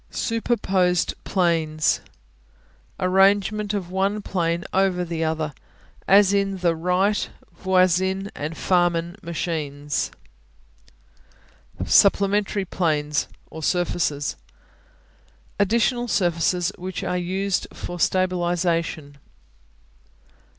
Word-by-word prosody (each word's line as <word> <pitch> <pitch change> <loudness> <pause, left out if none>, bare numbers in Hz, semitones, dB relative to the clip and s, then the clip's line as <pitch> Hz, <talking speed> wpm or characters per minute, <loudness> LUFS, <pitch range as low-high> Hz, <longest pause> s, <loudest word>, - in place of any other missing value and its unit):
Superposed 195 -6 0
Planes 165 -4 +1 1.0
Arrangement 200 +3 +3
of 180 -3 -4
one 200 +2 0
plane 170 -3 -1
over 185 -2 +2
the 165 -1 -3
other, 160 -2 -2 0.5
as 200 0 +6
in 195 -1 +1
the 175 -2 +1
Wright, 180 +5 +1 0.3
Voisin 190 +2 +1
and 155 +2 -5
Farman 175 -1 +1
machines. 150 -4 -3 1.8
Supplementary 200 0 +3
Planes 150 -5 0 0.2
(or 160 - -8
surfaces) 160 -4 -1 1.2
Additional 235 +4 +2
surfaces 175 -2 +1
which 185 0 -5
are 180 - -1
used 190 +2 -1
for 175 0 -7
stabilization. 175 -5 0
180 Hz, 80 wpm, -23 LUFS, 165-195 Hz, 1.8 s, as